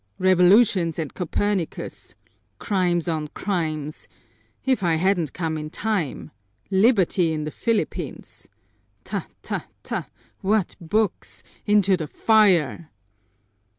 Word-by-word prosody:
"Revolutions 185 -1 +4
and 160 -4 -4
Copernicus! 185 0 -3 0.4
Crimes 180 -5 0
on 155 -2 -1
crimes! 155 -6 -3 0.6
If 260 -4 +2
I 170 -3 +2
hadn't 175 -3 +1
come 160 -3 -2
in 155 0 -6
time! 200 -5 -2 0.4
Liberty 190 -4 +3
in 155 -1 -2
the 150 - -4
Philippines! 230 +4 -3 0.6
Ta, - - -4 0.2
ta, - - -4 0.2
ta! - - -4 0.3
What 205 -1 0
books! 205 +4 -1 0.2
Into 200 -2 +4
the 160 -3 -4
fire!" 170 - +3
180 Hz, 105 wpm, -23 LUFS, 160-205 Hz, 0.6 s, Revolutions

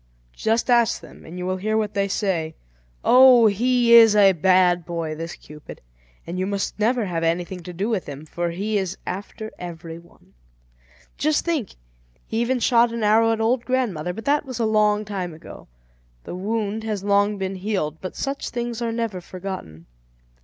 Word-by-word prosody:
Just 225 +3 0
ask 235 -1 +3
them, - - -15
and 170 +3 -9
you 180 - -4
will 185 0 -1
hear 215 +3 -1
what 215 -1 -1
they 200 0 0
say. 175 -6 -2 0.5
Oh! 255 -2 +7
he 235 +3 +3
is 225 -2 +8
a 200 -2 +6
bad 180 0 +3
boy, 165 -2 -4
this 165 +2 -6
Cupid, 150 0 -12 0.5
and 175 +2 -5
you 185 - -1
must 200 +1 -3
never 230 +1 +1
have 170 -3 -3
anything 175 +2 -1
to 180 - -8
do 190 +4 -3
with 220 -6 -2
him, 145 +2 -8
for 170 +2 -3
he 205 +5 -1
is 190 -1 -4
after 205 +3 -6
every 165 -2 -8
one. 170 - -23 0.9
Just 305 +1 +1
think, 315 - -2 0.5
he 225 +1 -2
even 250 +2 0
shot 235 0 +3
an 230 -1 -3
arrow 225 +2 +4
at 225 - -1
old 235 +2 +1
grandmother; 225 -11 -1
but 225 +5 -8
that 290 +1 +2
was 260 -4 -7
a 230 - +1
long 215 -1 +2
time 185 -5 -5
ago. 165 - -12 0.6
The - - -8
wound 215 +3 -2
has 210 -3 -3
long 205 +1 +2
been 190 0 -3
healed, 185 -6 -3
but 185 - -6
such 275 0 -3
things 240 -1 -4
are 230 -1 -1
never 225 -5 -3
forgotten. 180 - -8
205 Hz, 185 wpm, -23 LUFS, 180-230 Hz, 0.9 s, is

